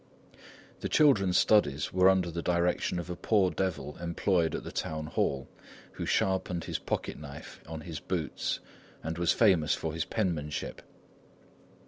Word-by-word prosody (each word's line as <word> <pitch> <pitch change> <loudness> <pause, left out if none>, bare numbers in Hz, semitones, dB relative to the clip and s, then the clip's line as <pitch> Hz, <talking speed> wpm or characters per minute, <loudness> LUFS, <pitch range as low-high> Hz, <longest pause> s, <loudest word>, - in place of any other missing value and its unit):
The - - -3
children's 100 -12 +4
studies 75 -10 +3
were 95 +1 +6
under 95 -2 +2
the 85 +1 -3
direction 90 +1 +1
of 85 - -4
a - - -3
poor 95 -1 +2
devil 85 -3 -3
employed 85 -1 +1
at - - -4
the - - -7
town 80 -1 -3
hall, 65 -3 -1 0.4
who - - -5
sharpened 95 -3 +1
his - - -3
pocketknife 70 -1 -5
on 80 -1 -6
his 80 -1 -6
boots 85 -5 -2 0.4
and 80 +1 -4
was 85 -1 +3
famous 95 -9 +4
for 80 -1 -4
his 80 0 -2
penmanship. 80 -8 -2
85 Hz, 145 wpm, -30 LUFS, 80-95 Hz, 0.4 s, were